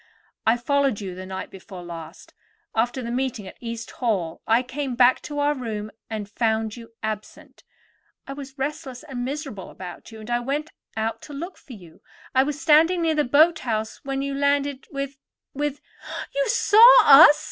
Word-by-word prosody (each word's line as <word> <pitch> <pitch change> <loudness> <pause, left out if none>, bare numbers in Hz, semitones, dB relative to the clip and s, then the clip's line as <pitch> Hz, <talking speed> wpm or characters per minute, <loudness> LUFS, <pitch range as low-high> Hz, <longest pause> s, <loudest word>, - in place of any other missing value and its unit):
I 225 +2 +5
followed 275 -2 +1
you 195 -3 -5
the 185 +1 -8
night 190 0 -6
before 190 -1 -10
last. 165 -2 -10 0.4
After 240 +3 0
the 235 - -4
meeting 250 -5 -2
at - - -12
East 230 -1 -6
Hall 195 -10 -2
I 230 +3 +4
came 260 0 -4
back 250 +1 +5
to 295 - -7
our 290 +1 +2
room 215 -5 -5 0.2
and 215 -2 -4
found 220 0 -1
you 230 -1 -12
absent. 215 -1 -6 0.6
I 275 - -6
was 275 -1 -10
restless 275 -2 -4
and 265 -5 -5
miserable 270 - -5
about 185 +4 -10
you, 220 - -11
and 215 +2 -8
I 240 - +2
went 285 +5 -3 0.3
out 220 +1 -2
to 295 - -10
look 340 +7 -6
for 265 - -14
you. 175 -7 -14 0.3
I 260 - +5
was 290 +2 -2
standing 325 +2 +4
near 325 -1 +2
the 300 -1 +2
boat 310 +6 +4
house 220 -3 -3
when 275 0 -2
you 280 0 -3
landed 280 -1 0
with—with——" 275 +1 -6 0.5
"You - - 0
saw 440 +2 +7 0.2
us?" 295 +1 +9
260 Hz, 180 wpm, -24 LUFS, 220-285 Hz, 0.6 s, us